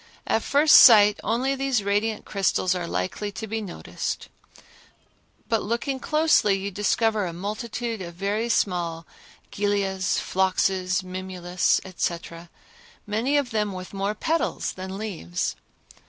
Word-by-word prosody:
At 225 - +1
first 295 +5 +6
sight 210 -4 +8
only 245 +5 0
these 270 -5 0
radiant 210 +2 -1
crystals 195 -2 +1
are 180 -2 -3
likely 95 - -3
to 220 - -5
be 220 +1 -3
noticed, 195 -5 -5 1.2
but 225 -3 +1
looking 235 +5 -2
closely 305 -10 +3
you 195 +1 -4
discover 210 +1 +1
a 170 - -5
multitude 215 +4 -4
of 170 -2 -7
very 205 +5 -1
small 170 -6 0 0.5
gilias, 195 -2 0
phloxes, 185 0 0
mimulus, 185 -1 -1
etc., 170 -2 -4 0.6
many 230 +8 0
of 280 -4 -1
them 210 -2 -1
with 185 +1 -8
more 200 +2 -2
petals 325 +8 -1
than 190 +1 -7
leaves. 180 - -3
200 Hz, 125 wpm, -25 LUFS, 185-225 Hz, 1.2 s, sight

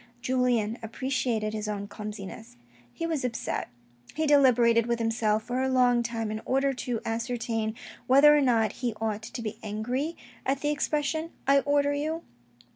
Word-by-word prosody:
Julien 245 -3 +1
appreciated 230 -2 -1
his 215 -1 -3
own 205 -1 -3
clumsiness. 210 - -8 0.3
He 330 - -4
was 320 -5 -1
upset. 245 -2 -3 0.5
He 315 +1 0
deliberated 245 -5 +5
with 235 0 +1
himself 225 -2 +1
for 250 +3 -2
a 265 - +1
long 250 -2 +4
time, 230 -2 -3
in 215 0 -4
order 270 +1 +1
to 245 -3 -3
ascertain 225 -1 -2 0.3
whether 285 +3 +7
or 295 - +4
not 230 -5 +3
he 240 -4 -1
ought 220 -1 -2
to 235 +2 -7
be 215 0 -5
angry 245 +9 -3 0.3
at 275 +1 -1
the 295 - +1
expression 300 +2 -1
" - - -34
I 275 0 +6
order 285 0 +2
you." 310 +3 -2
240 Hz, 165 wpm, -28 LUFS, 220-275 Hz, 0.5 s, whether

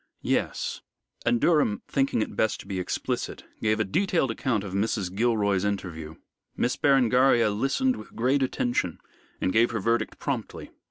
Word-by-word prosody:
"Yes." - - -1 0.5
And 120 0 +3
Durham, 145 -11 +2
thinking 135 -5 +1
it - - -8
best 110 - +1
to - - -15
be 95 -2 -3
explicit, 90 - -3 0.2
gave 110 0 +1
a - - +3
detailed 165 - +1
account 115 -3 -1
of 95 -2 -7
Mrs. 100 -2 -1
Gilroy's 100 -3 +1
interview. 85 -6 -3 0.4
Miss 125 - +1
Berengaria 125 -4 +4
listened 135 - +1
with - - -12
great 130 +4 +2
attention, 120 -8 0 0.4
and 95 - 0
gave 115 +1 +4
her 115 - -2
verdict 115 +2 0
promptly. - - -4
115 Hz, 155 wpm, -26 LUFS, 100-130 Hz, 0.5 s, Berengaria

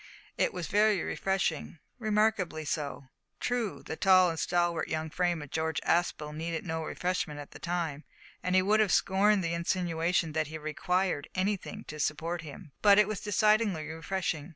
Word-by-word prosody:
It - - +1
was 180 -2 -4
very 210 +1 +3
refreshing 185 -5 -1 0.2
remarkably 210 -7 +1
so! 140 -3 -3 0.3
True, 245 -4 -2
the - - -5
tall 185 0 +5
and 165 - -5
stalwart 175 -2 +1
young 160 0 -3
frame 175 -3 0
of 145 - -12
George 160 -2 -1
Aspel 155 -3 0
needed 165 +1 -3
no 160 -1 -2
refreshment 175 -3 -2
at 145 - -9
the - - -11
time, 170 -4 -2 0.4
and 180 0 0
he 185 - +5
would 210 +3 +3
have 210 -4 +3
scorned 200 +1 +3
the 165 0 -1
insinuation 170 -1 0
that 155 -1 0
he 160 +1 -6
required 155 +1 -1
anything 205 +2 -2
to 155 - -9
support 165 +3 -1
him 155 +1 -10
but 205 -1 +7
but - - +5
it 210 -1 +6
was 215 -2 -3
decidedly 210 -5 +2
refreshing! 160 -1 -3
175 Hz, 175 wpm, -30 LUFS, 160-195 Hz, 0.4 s, but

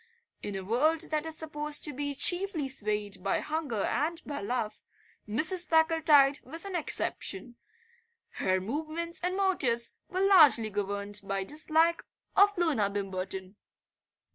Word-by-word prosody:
In 205 - -5
a 190 - -5
world 310 - +1
that 310 +1 -1
is 320 -1 -2
supposed 300 -2 -2
to 295 - 0
be 285 +1 -4
chiefly 355 -2 +2
swayed 210 -6 -2
by 195 - 0
hunger 300 -9 -3
and 325 +3 -1
by 285 -1 -5
love 220 0 -3 0.5
Mrs. 320 - +3
Packletide 320 -4 +4
was 325 +7 -7
an 390 -2 -5
exception; 310 -4 -1 0.8
her 185 0 +1
movements 310 - -5
and 365 +1 -1
motives 265 -12 +1
were 370 - -2
largely 305 - +6
governed 205 0 -3
by 195 0 -3
dislike 315 - +1 0.3
of 405 0 +4
Loona 290 - +1
Bimberton. 190 -1 -5
295 Hz, 135 wpm, -29 LUFS, 210-325 Hz, 0.8 s, largely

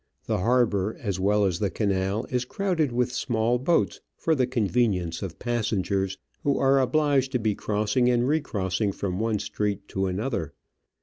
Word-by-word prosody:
The - - 0
harbour 110 -2 +2
as 100 -5 -3
well 100 +2 +3
as 90 -3 0
the 100 - +1
canal 100 +1 0
is 125 -1 +1
crowded 165 -1 0
with 125 0 0
small 120 -1 0
boats 165 +6 +1 0.2
for 165 - +1
the 130 -5 +2
convenience 105 -8 0
of 90 -4 -5
passengers 100 -5 -1 0.2
who 140 -1 +1
are 135 0 +4
obliged 135 0 +2
to 125 - +2
be 110 -2 +1
crossing 105 +5 +1
and 120 0 +2
re 155 +3 +2
crossing 100 -4 -1
from 95 -1 -3
one 110 -1 +1
street 105 0 -3
to 95 0 -1
another. 95 - -3
110 Hz, 170 wpm, -26 LUFS, 100-125 Hz, 0.2 s, are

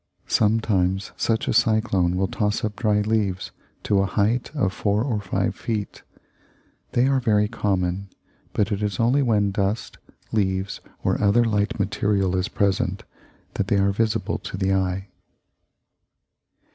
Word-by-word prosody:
Sometimes 100 -3 +1
such 110 +2 0
a 130 - +1
cyclone 110 -6 +2
will 95 +1 +1
toss 105 +1 -1
up 105 -1 -3
dry 105 -1 +1
leaves 105 -3 -1 0.3
to 100 - +2
a 95 - +2
height 110 +5 0
of 95 -10 0
four 105 +2 0
or 115 -6 -1
five - - -1
feet. 105 -3 -4 0.9
They 120 - +3
are 135 0 +3
very 105 -4 +2
common; 95 -3 -1 0.4
but 105 +1 0
it 100 0 -1
is 105 -4 -2
only 125 +5 +3
when 105 -6 +2
dust, 100 +3 -2 0.3
leaves, 95 -2 -1 0.2
or - - +1
other 105 +4 +4
light 105 -2 0
material 100 -1 +1
is 90 +1 0
present 100 -2 0 0.5
that 95 - -2
they 100 - +2
are 100 0 +3
visible 110 +2 0
to - - -6
the 95 0 +1
eye. 95 +1 -1
105 Hz, 145 wpm, -23 LUFS, 95-110 Hz, 0.9 s, other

